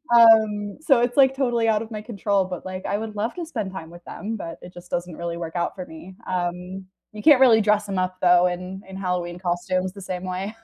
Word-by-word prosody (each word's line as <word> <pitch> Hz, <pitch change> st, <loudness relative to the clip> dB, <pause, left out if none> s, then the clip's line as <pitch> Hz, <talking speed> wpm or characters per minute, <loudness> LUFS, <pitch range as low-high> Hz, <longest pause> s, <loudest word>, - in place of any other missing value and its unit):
um, 215 Hz, -3 st, +5 dB
so, 275 Hz, -6 st, +3 dB
it's, 245 Hz, +2 st, 0 dB
like, 270 Hz, -1 st, +5 dB
totally 240 Hz, -4 st, +1 dB
out 215 Hz, -1 st, +2 dB
of 230 Hz, -, -8 dB
my 215 Hz, -1 st, -5 dB
control, 205 Hz, -3 st, 0 dB
but, 180 Hz, -1 st, -7 dB
like, 185 Hz, 0 st, -6 dB
I 200 Hz, -, 0 dB
would 215 Hz, -1 st, -6 dB
love 225 Hz, +3 st, -2 dB
to 345 Hz, -2 st, -4 dB
spend 215 Hz, -, -4 dB
time 165 Hz, -3 st, -7 dB
with 175 Hz, 0 st, -13 dB
them, 220 Hz, +2 st, -5 dB
but 165 Hz, -3 st, -7 dB
it 180 Hz, -, -12 dB
just 175 Hz, 0 st, -13 dB
doesn't 175 Hz, -1 st, -3 dB
really 170 Hz, 0 st, -4 dB
work 165 Hz, 0 st, -6 dB
out 175 Hz, -, -1 dB
for 185 Hz, -2 st, -6 dB
me, 165 Hz, +4 st, -12 dB
um, 180 Hz, +1 st, -3 dB, 0.3 s
you 210 Hz, 0 st, -8 dB
can't 290 Hz, -4 st, +6 dB
really 235 Hz, -4 st, +7 dB
dress 210 Hz, 0 st, +2 dB
them 195 Hz, -2 st, -2 dB
up 185 Hz, 0 st, -2 dB
though 180 Hz, 0 st, +6 dB
in, 180 Hz, +2 st, -5 dB
in 190 Hz, -, -8 dB
Halloween 180 Hz, -2 st, -2 dB
costumes 185 Hz, +1 st, -1 dB
the 200 Hz, -, -10 dB
same 180 Hz, -1 st, -5 dB
way. 185 Hz, +3 st, -4 dB
190 Hz, 245 wpm, -23 LUFS, 180-220 Hz, 0.3 s, really